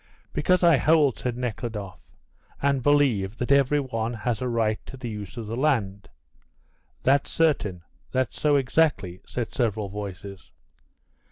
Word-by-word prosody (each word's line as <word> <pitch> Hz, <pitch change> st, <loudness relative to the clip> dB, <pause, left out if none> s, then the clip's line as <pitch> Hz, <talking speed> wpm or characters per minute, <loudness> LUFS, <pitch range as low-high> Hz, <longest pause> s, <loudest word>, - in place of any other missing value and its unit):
"Because 180 Hz, +5 st, +2 dB
I 170 Hz, -4 st, +6 dB
hold," 150 Hz, -1 st, +3 dB
said 125 Hz, -1 st, -3 dB
Nekhludoff, 110 Hz, -5 st, -5 dB, 0.6 s
"and 140 Hz, -1 st, +1 dB
believe 120 Hz, -8 st, +2 dB
that 125 Hz, -, -2 dB
every 140 Hz, +1 st, +4 dB
one 120 Hz, -3 st, -3 dB
has 110 Hz, 0 st, -2 dB
a 125 Hz, -, -1 dB
right 110 Hz, -2 st, 0 dB
to 135 Hz, -, -9 dB
the 120 Hz, -3 st, -5 dB
use 105 Hz, +1 st, -7 dB
of 115 Hz, -, -5 dB
the 110 Hz, +2 st, -4 dB
land." 105 Hz, -9 st, 0 dB, 0.9 s
"That's 140 Hz, +1 st, +3 dB
certain. 105 Hz, -, +1 dB, 0.3 s
That's 130 Hz, -3 st, -1 dB
so, 150 Hz, -1 st, +4 dB
exactly," 135 Hz, -, +1 dB
said 120 Hz, -3 st, -4 dB
several 110 Hz, -5 st, -1 dB
voices. 100 Hz, -5 st, -8 dB
120 Hz, 145 wpm, -25 LUFS, 105-140 Hz, 0.9 s, I